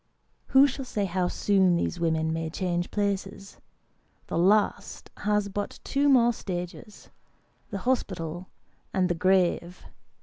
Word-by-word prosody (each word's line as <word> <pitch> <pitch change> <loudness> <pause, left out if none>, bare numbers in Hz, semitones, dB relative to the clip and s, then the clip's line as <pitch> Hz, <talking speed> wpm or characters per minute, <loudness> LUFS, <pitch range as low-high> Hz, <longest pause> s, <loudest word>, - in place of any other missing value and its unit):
Who 270 +1 +6
shall 275 0 -3
say 210 -5 -2
how 180 -1 0
soon 190 -2 +2
these 170 +1 -2
women 160 -1 0
may 165 0 -3
change 175 0 -2
places? 200 -1 -3 0.7
The - - -4
last 205 +4 +1
has 210 -1 0
but 200 +1 -5
two 285 +1 +1
more 240 -3 +5
stages 185 +2 -7 0.6
the 200 - -4
hospital 180 -8 -2 0.5
and 185 -1 +2
the - - +2
grave. 180 0 +1
190 Hz, 130 wpm, -27 LUFS, 175-210 Hz, 0.7 s, Who